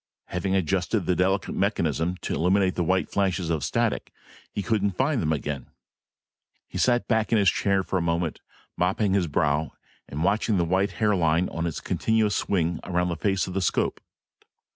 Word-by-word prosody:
Having 95 Hz, +2 st, -1 dB
adjusted 95 Hz, +3 st, +1 dB
the 90 Hz, -, +1 dB
delicate 95 Hz, +1 st, +1 dB
mechanism 90 Hz, -3 st, 0 dB
to -, -, -2 dB
eliminate 95 Hz, +2 st, +2 dB
the 90 Hz, -, -1 dB
white 90 Hz, +2 st, +1 dB
flashes 95 Hz, -4 st, 0 dB
of 80 Hz, -2 st, -1 dB
static, -, -, -1 dB, 0.4 s
he 100 Hz, -, -3 dB
couldn't 100 Hz, -4 st, 0 dB
find 135 Hz, -1 st, +1 dB
them 80 Hz, -, 0 dB
again. 75 Hz, -2 st, -3 dB, 1.0 s
He -, -, -5 dB
sat 120 Hz, -1 st, +2 dB
back 110 Hz, -2 st, +1 dB
in 115 Hz, -, +4 dB
his 100 Hz, -3 st, +4 dB
chair 100 Hz, -1 st, +1 dB
for 95 Hz, -, -2 dB
a -, -, -1 dB
moment, 85 Hz, -1 st, -1 dB, 0.4 s
mopping 95 Hz, +2 st, +1 dB
his 95 Hz, -3 st, +2 dB
brow 75 Hz, +1 st, 0 dB, 0.4 s
and 75 Hz, +3 st, -3 dB
watching 105 Hz, +2 st, +2 dB
the 85 Hz, -, +2 dB
white 95 Hz, +3 st, +1 dB
hairline 90 Hz, -5 st, +2 dB
in 85 Hz, +1 st, -1 dB
its 80 Hz, -, -4 dB
continuous 110 Hz, -2 st, +1 dB
swing 85 Hz, -4 st, 0 dB
around 90 Hz, 0 st, 0 dB
the 85 Hz, -, -1 dB
face 95 Hz, +4 st, 0 dB
of 90 Hz, -, -6 dB
the 95 Hz, -, -1 dB
scope. 90 Hz, -, 0 dB
95 Hz, 180 wpm, -25 LUFS, 85-100 Hz, 1.0 s, in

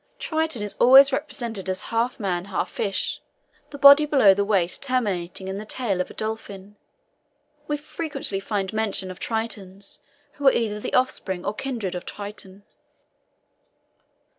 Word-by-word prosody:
Triton 315 Hz, -8 st, -1 dB
is 205 Hz, -, -3 dB
always 270 Hz, +2 st, +8 dB
represented 225 Hz, -8 st, -3 dB
as 185 Hz, 0 st, -1 dB
half 235 Hz, +2 st, 0 dB
man, 180 Hz, -4 st, -2 dB
half 200 Hz, -, -3 dB
fish, 200 Hz, -2 st, -2 dB, 0.5 s
the 285 Hz, -, -9 dB
body 280 Hz, +2 st, +8 dB
below 265 Hz, -10 st, +6 dB
the 200 Hz, +1 st, 0 dB
waist 195 Hz, -4 st, 0 dB
terminating 195 Hz, -9 st, -2 dB
in 190 Hz, +1 st, -4 dB
the -, -, -6 dB
tail 215 Hz, -4 st, -2 dB
of -, -, -4 dB
a -, -, -12 dB
dolphin. 210 Hz, -2 st, -6 dB, 0.9 s
We 295 Hz, -, -1 dB
frequently 290 Hz, -8 st, -4 dB
find 195 Hz, -1 st, -3 dB
mention 205 Hz, -4 st, -1 dB
of 185 Hz, -, -11 dB
Tritons 200 Hz, -4 st, -4 dB, 0.3 s
who 285 Hz, -1 st, -1 dB
are -, -, +9 dB
either 210 Hz, -3 st, -1 dB
the -, -, -3 dB
offspring 190 Hz, -8 st, 0 dB
or -, -, -1 dB
kindred 225 Hz, -6 st, -4 dB
of 180 Hz, -, -5 dB
Triton. 200 Hz, -1 st, -9 dB
210 Hz, 150 wpm, -24 LUFS, 195-255 Hz, 0.9 s, are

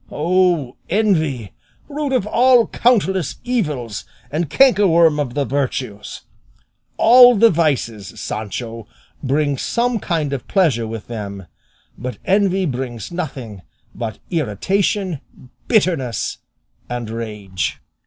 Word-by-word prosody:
O 170 Hz, -5 st, +1 dB
envy, 160 Hz, -, +1 dB, 0.4 s
root 290 Hz, -1 st, -3 dB
of 255 Hz, -7 st, +1 dB
all 245 Hz, +2 st, +4 dB
countless 190 Hz, -7 st, +1 dB
evils, 150 Hz, -, -2 dB, 0.3 s
and 155 Hz, +1 st, -1 dB
cankerworm 170 Hz, -, +4 dB
of 130 Hz, -5 st, -2 dB
the 145 Hz, -1 st, 0 dB
virtues! 125 Hz, -5 st, -3 dB, 0.8 s
All 245 Hz, +1 st, +8 dB
the 230 Hz, +2 st, +5 dB
vices, 120 Hz, -, -1 dB
Sancho, 110 Hz, +1 st, -5 dB, 0.3 s
bring 145 Hz, 0 st, 0 dB
some 240 Hz, -1 st, 0 dB
kind 155 Hz, -6 st, -1 dB
of 135 Hz, -, -5 dB
pleasure 145 Hz, -, +2 dB
with 110 Hz, -1 st, -6 dB
them; 100 Hz, -4 st, -6 dB, 0.5 s
but 125 Hz, +3 st, -5 dB
envy 195 Hz, -1 st, +2 dB
brings 125 Hz, -, -4 dB
nothing 135 Hz, -, -6 dB, 0.3 s
but 110 Hz, -3 st, -5 dB
irritation, 175 Hz, -, -1 dB, 0.5 s
bitterness, 165 Hz, -, 0 dB, 0.5 s
and 120 Hz, -2 st, -4 dB
rage." 105 Hz, -6 st, -4 dB
150 Hz, 105 wpm, -19 LUFS, 115-195 Hz, 0.8 s, All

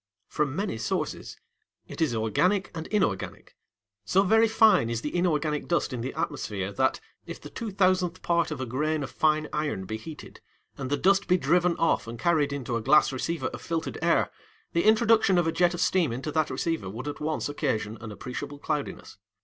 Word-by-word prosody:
From 145 Hz, -2 st, -1 dB
many 195 Hz, -, -2 dB
sources. 110 Hz, -, -3 dB, 0.5 s
It -, -, -8 dB
is 150 Hz, -7 st, +2 dB
organic 180 Hz, -, +1 dB
and 160 Hz, 0 st, -5 dB
inorganic. 110 Hz, -, -2 dB, 0.5 s
So 190 Hz, -, +3 dB
very 225 Hz, +3 st, +4 dB
fine 215 Hz, -, +4 dB
is 115 Hz, -1 st, -2 dB
the 150 Hz, -, -4 dB
inorganic 155 Hz, -4 st, 0 dB
dust 170 Hz, -5 st, 0 dB
in 120 Hz, -, -3 dB
the 130 Hz, +3 st, -4 dB
atmosphere 105 Hz, -, -3 dB
that, 130 Hz, +6 st, +1 dB, 0.3 s
if -, -, -7 dB
the -, -, -11 dB
two 230 Hz, -2 st, -5 dB
thousandth 185 Hz, -2 st, +1 dB
part 170 Hz, -1 st, +1 dB
of 155 Hz, -3 st, -5 dB
a 130 Hz, -, -2 dB
grain 150 Hz, +5 st, -1 dB
of 135 Hz, -, -6 dB
fine 155 Hz, -1 st, +2 dB
iron 150 Hz, -11 st, -2 dB
be 110 Hz, +3 st, -4 dB
heated, 150 Hz, +7 st, -11 dB, 0.3 s
and 135 Hz, -2 st, -5 dB
the 145 Hz, -, +1 dB
dust 195 Hz, +1 st, +3 dB
be 180 Hz, -, +4 dB
driven 180 Hz, -1 st, +2 dB
off 165 Hz, -7 st, +1 dB
and 115 Hz, +1 st, -6 dB
carried 150 Hz, +2 st, +2 dB
into 130 Hz, -4 st, -3 dB
a 115 Hz, -, -1 dB
glass 140 Hz, +4 st, +4 dB
receiver 165 Hz, +6 st, -2 dB
of -, -, -9 dB
filtered 165 Hz, -1 st, -3 dB
air, -, -, +2 dB, 0.4 s
the 170 Hz, -, +1 dB
introduction 220 Hz, -3 st, +4 dB
of 175 Hz, -, +3 dB
a 165 Hz, -, +1 dB
jet 175 Hz, +1 st, +2 dB
of -, -, -6 dB
steam 180 Hz, -7 st, +2 dB
into 130 Hz, +6 st, -4 dB
that 155 Hz, 0 st, +1 dB
receiver 165 Hz, -, -2 dB
would 115 Hz, +8 st, -6 dB
at 145 Hz, -, -5 dB
once 155 Hz, +1 st, -2 dB
occasion 115 Hz, -7 st, -2 dB
an 110 Hz, -1 st, -7 dB
appreciable 125 Hz, +7 st, -6 dB
cloudiness. 145 Hz, -6 st, -4 dB
155 Hz, 200 wpm, -27 LUFS, 130-175 Hz, 0.5 s, very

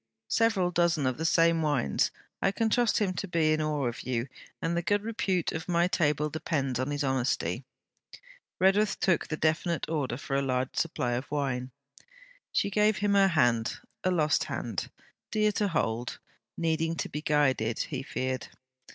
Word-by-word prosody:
Several 210 Hz, -6 st, +2 dB
dozen 170 Hz, -4 st, +2 dB
of 130 Hz, +2 st, -1 dB
the 160 Hz, -, -1 dB
same 165 Hz, 0 st, +4 dB
wines. 145 Hz, -, +1 dB, 0.3 s
I 195 Hz, -, +3 dB
can 220 Hz, +2 st, 0 dB
trust 240 Hz, -1 st, +3 dB
him 205 Hz, -5 st, +1 dB
to 190 Hz, +3 st, -4 dB
be 160 Hz, -3 st, +2 dB
in 155 Hz, -, 0 dB
awe 150 Hz, -3 st, 0 dB
of 120 Hz, -1 st, -3 dB
you, 125 Hz, +1 st, -2 dB, 0.3 s
and 165 Hz, +1 st, -1 dB
the 170 Hz, -, +1 dB
good 205 Hz, +4 st, +1 dB
repute 195 Hz, -6 st, -1 dB
of 160 Hz, +2 st, -5 dB
my 170 Hz, 0 st, +3 dB
table 150 Hz, -5 st, +1 dB
depends 140 Hz, -4 st, -2 dB
on 130 Hz, +2 st, -1 dB
his 145 Hz, 0 st, -1 dB
honesty.' 130 Hz, -2 st, 0 dB, 0.9 s
Redworth 195 Hz, +2 st, +3 dB
took 180 Hz, -3 st, +2 dB
the 155 Hz, -, -3 dB
definite 160 Hz, +1 st, 0 dB
order 145 Hz, -7 st, -1 dB
for 135 Hz, 0 st, -4 dB
a 140 Hz, -, +2 dB
large 130 Hz, -1 st, -1 dB
supply 130 Hz, -7 st, -1 dB
of 125 Hz, +3 st, -3 dB
wine. 130 Hz, -4 st, -2 dB, 0.8 s
She 200 Hz, -, +1 dB
gave 210 Hz, +1 st, +3 dB
him 205 Hz, 0 st, +1 dB
her 195 Hz, -1 st, +6 dB
hand: 120 Hz, -10 st, +2 dB, 0.3 s
a 185 Hz, -, +2 dB
lost 155 Hz, -4 st, +2 dB
hand, -, -, -4 dB, 0.4 s
dear 215 Hz, -1 st, +2 dB
to 205 Hz, 0 st, 0 dB
hold, 120 Hz, -, -1 dB, 0.4 s
needing 165 Hz, 0 st, 0 dB
to -, -, -3 dB
be 150 Hz, -, -5 dB
guided, 135 Hz, -7 st, +1 dB
he 135 Hz, -4 st, -3 dB
feared. 130 Hz, -1 st, -3 dB
155 Hz, 175 wpm, -29 LUFS, 135-185 Hz, 0.9 s, her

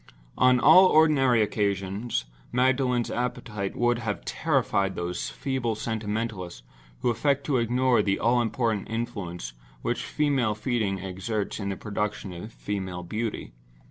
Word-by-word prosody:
On 130 Hz, -1 st, +5 dB
all 180 Hz, +8 st, +8 dB
ordinary 135 Hz, -8 st, +4 dB
occasions 100 Hz, -, -1 dB, 0.3 s
Magdalen's 125 Hz, -1 st, +2 dB
appetite 105 Hz, -5 st, -3 dB
would 120 Hz, 0 st, +2 dB
have 110 Hz, -3 st, -4 dB
terrified 95 Hz, -1 st, 0 dB
those 90 Hz, 0 st, -3 dB
feeble 130 Hz, -5 st, -2 dB
sentimentalists 110 Hz, -, -4 dB, 0.4 s
who 120 Hz, -, +2 dB
affect 140 Hz, +4 st, +1 dB
to 140 Hz, -2 st, +1 dB
ignore 125 Hz, +1 st, +3 dB
the 95 Hz, -1 st, +1 dB
all 120 Hz, +2 st, +3 dB
important 115 Hz, -3 st, -1 dB
influence 100 Hz, -, -4 dB, 0.3 s
which -, -, -1 dB
female 135 Hz, -8 st, +1 dB
feeding 110 Hz, -3 st, -1 dB
exerts 95 Hz, +4 st, -3 dB
in 100 Hz, -1 st, -3 dB
the 95 Hz, -, -3 dB
production 105 Hz, -2 st, -3 dB
of 90 Hz, +6 st, -8 dB
female 95 Hz, -5 st, -4 dB
beauty. 110 Hz, -, -4 dB
110 Hz, 130 wpm, -26 LUFS, 100-125 Hz, 0.4 s, all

